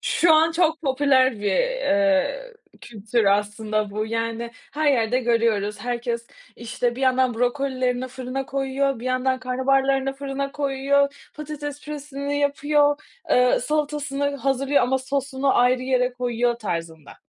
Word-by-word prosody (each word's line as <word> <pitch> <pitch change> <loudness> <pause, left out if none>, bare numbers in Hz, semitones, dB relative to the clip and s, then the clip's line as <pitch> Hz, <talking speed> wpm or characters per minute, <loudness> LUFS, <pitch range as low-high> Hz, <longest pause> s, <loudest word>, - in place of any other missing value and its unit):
Şu 345 -8 +3
an 320 +1 +4
çok 325 -2 +1
popüler 265 -2 +3
bir, 205 - 0
eee, - - +1 0.3
kültür 220 +1 -2
aslında 210 +1 0
bu. 215 +2 -3
Yani 230 +1 -3 0.2
her 295 0 +2
yerde 235 -1 +1
görüyoruz 225 -4 0
herkes, 235 0 -3 0.3
işte, 240 +1 -2
bir - - -6
yandan 255 -1 +2
brokolilerini 255 +1 -1
fırına 260 +1 -5
koyuyor, 270 -1 -1
bir - - -8
yandan 255 0 0
karnabaharlarını 270 +1 +1
fırına 275 0 -4
koyuyor, 280 0 0
patates 295 -1 -6
püresini 285 -1 -4
yapıyor, 290 +1 +2 0.4
ııı, 250 0 +4
salatasını 285 0 -1
hazırlıyor 275 +1 +1
ama 260 +2 +1
sosunu 270 +1 -1
ayrı 250 +1 +3
yere 255 -1 +1
koyuyor 245 -1 0
tarzında. 165 -8 -6
260 Hz, 130 wpm, -23 LUFS, 235-280 Hz, 0.4 s, an